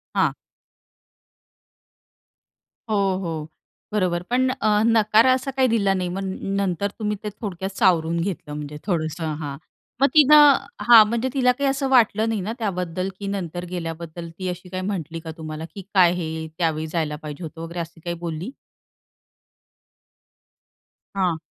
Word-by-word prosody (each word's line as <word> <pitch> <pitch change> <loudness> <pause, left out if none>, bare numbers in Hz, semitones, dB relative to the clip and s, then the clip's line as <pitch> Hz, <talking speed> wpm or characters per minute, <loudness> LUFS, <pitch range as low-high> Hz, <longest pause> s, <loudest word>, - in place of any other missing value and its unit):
हां. - - +3 2.6
हो, 215 - +1 0.3
हो 160 -2 -4 0.4
बरोबर 180 -4 0
पण 255 +2 +2
अ, 215 -5 +1
नकार 220 0 +4
असा 260 +1 +2
काही 260 -1 +4
दिला 200 -4 +2
नाही 180 -2 -2
मग 190 +2 -4 0.3
नंतर 200 0 0
तुम्ही 210 -1 -1
ते 210 - -2
थोडक्यात 190 -3 -4
सावरून 170 -2 +3
घेतलं 165 -4 -4
म्हणजे 150 0 -6
थोडंसं 160 -2 -1
हां 140 -2 -5 0.4
मग 275 - +7
तिनं 295 -1 +8 0.3
हां 230 -2 +10
म्हणजे 235 +3 -1
तिला 250 -2 +4
काही 275 +2 0
असं 270 0 -1
वाटलं 225 -3 +4
नाही 220 -3 -1
ना 210 +5 -3
त्याबद्दल 185 -3 -2
की 200 - -5
नंतर 180 -3 -4
गेल्याबद्दल 170 -1 -6
ती 185 - -3
अशी 180 +1 -7
काही 185 0 -4
म्हटली 165 -5 -4
का 160 0 -7
तुम्हाला, 155 0 -6
की 195 - -6
काय 180 -3 +6
हे 160 -2 -4
त्यावेळी 160 -2 0
जायला 155 -2 -2
पाहिजे 150 +2 -8
होतं 160 +1 -8
वगैरे 170 +1 -6
अशी 165 0 -6
काही 170 +1 -4
बोलली? 170 +5 -5 2.6
हां. 180 -4 +1
180 Hz, 150 wpm, -23 LUFS, 165-215 Hz, 2.6 s, हां